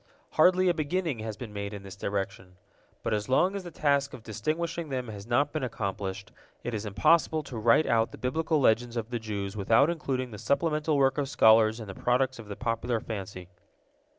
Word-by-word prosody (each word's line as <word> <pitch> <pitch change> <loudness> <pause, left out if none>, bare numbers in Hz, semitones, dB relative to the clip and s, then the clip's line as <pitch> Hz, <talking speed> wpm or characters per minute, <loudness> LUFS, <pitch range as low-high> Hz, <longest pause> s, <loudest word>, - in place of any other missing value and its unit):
Hardly 185 0 +4
a 175 - +4
beginning 160 -3 -1
has 110 -2 -5
been 110 -2 -8
made 100 0 -4
in 100 - -9
this 95 -1 -9
direction. 95 -2 -4 0.5
But - - -1
as 105 +3 -2
long 180 +9 +3
as 200 - -4
the 175 - -7
task 140 -3 +1
of 115 - -13
distinguishing 165 +8 -3
them 130 -3 -3
has 100 -1 -8
not 140 +5 +2
been 155 - -2
accomplished, 100 -4 -4 0.3
it 120 - -3
is 105 0 -3
impossible 155 +9 +3
to 125 - -7
write 115 +8 +4
out 115 -1 +2
the - - -10
Biblical 155 +4 0
legends 120 -1 +2
of 115 +1 -4
the 120 - -1
Jews 100 -3 -4
without 115 - +4
including 130 -6 -3
the 105 - -8
supplemental 150 +1 +1
work 135 +1 +3
of 140 -2 -1
scholars 110 -4 +5
in 110 - -6
the 95 - -6
products 130 +4 0
of 110 - -9
the 100 - -6
popular 115 0 -1
fancy. 95 -5 -7
120 Hz, 205 wpm, -28 LUFS, 105-145 Hz, 0.5 s, scholars